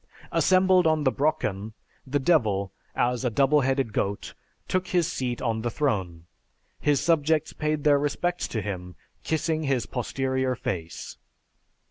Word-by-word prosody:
Assembled 185 -1 +4
on 155 -1 +2
the 130 - +3
Brocken, 110 -9 -1 0.3
the 140 +2 +1
Devil, 110 - +2 0.2
as 125 +1 +1
a 125 - +2
double 140 +5 +3
headed 135 -3 0
goat, 100 +1 -2 0.3
took 185 0 0
his 175 -2 +2
seat 125 -8 -3
on 115 -2 0
the 120 - -1
throne. 95 - -2 0.5
His 145 -2 +2
subjects 160 -1 +2
paid 150 -1 -1
their 145 -1 +5
respects 175 +5 -1
to 110 -3 -3
him, 90 -3 -5 0.3
kissing 160 +1 -1
his 135 -6 0
posterior 130 +1 -1
face. 95 -10 -5
135 Hz, 140 wpm, -26 LUFS, 110-155 Hz, 0.5 s, their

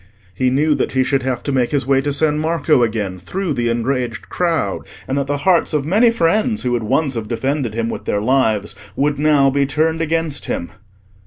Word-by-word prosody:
He 130 +7 +1
knew 150 +4 +2
that - - -1
he 130 0 +3
should 135 +1 0
have 130 -2 -2
to 140 - -2
make 130 -3 +1
his 140 -4 -1
way 135 0 +3
to 145 +1 -2
San 150 +1 +1
Marco 155 -3 +2
again 105 -5 -1
through 180 - -3
the 120 -3 -1
enraged 120 0 -2
crowd, 170 -2 -1 0.3
and 130 - -2
that 140 -1 -1
the 145 +1 -1
hearts 175 -4 +3
of 145 -2 0
many 215 +9 +4
friends 220 +3 +1
who 125 - 0
would 120 -1 0
once 135 +6 0
have 115 -3 -4
defended 130 0 -2
him 115 0 -1
with - - -5
their 100 - 0
lives 110 -3 +1 0.2
would 145 0 0
now 145 -2 +4
be 140 0 +1
turned 160 +2 0
against 165 -2 -1
him. 85 - -4
140 Hz, 215 wpm, -18 LUFS, 120-155 Hz, 0.3 s, many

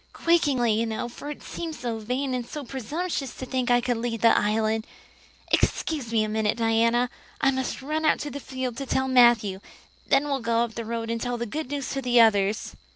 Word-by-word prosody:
quakingly, 280 -9 +2
you 225 +2 +1
know, 220 +2 -3
for 265 +4 -8
it 295 - -7
seemed 325 -2 -5
so 235 -5 -4
vain 255 +5 -2
and 245 -2 -3 0.2
presumptuous 275 +4 -3
to 260 - -6
think 255 -1 -1
I 245 0 +4
could 245 -1 0
lead 230 -1 -3
the 230 - +6
Island. 220 +1 +1 0.6
Excuse 285 -8 0
me 225 -2 +3
a - - -1
minute, 215 0 0
Diana. 230 +2 +2 0.3
I 270 - +3
must 260 0 -3
run 305 +3 -1
right 310 - +4
out - - -9
to 295 - -4
the 285 - -5
field 260 -3 -5
to 275 -1 -5
tell 265 +1 +1
Matthew. 235 -6 +4 0.5
Then 275 +1 +3
we'll 275 -2 -1
go 230 0 +2
up 235 -2 -4
the 230 0 -5
road 230 0 -3
and 230 0 -2
tell 245 -1 -2
the 235 - -3
good 300 +5 -5
news 285 -2 -3
to 270 - -2
the 245 -1 +3
others." 210 -2 +3
245 Hz, 220 wpm, -26 LUFS, 225-270 Hz, 0.6 s, the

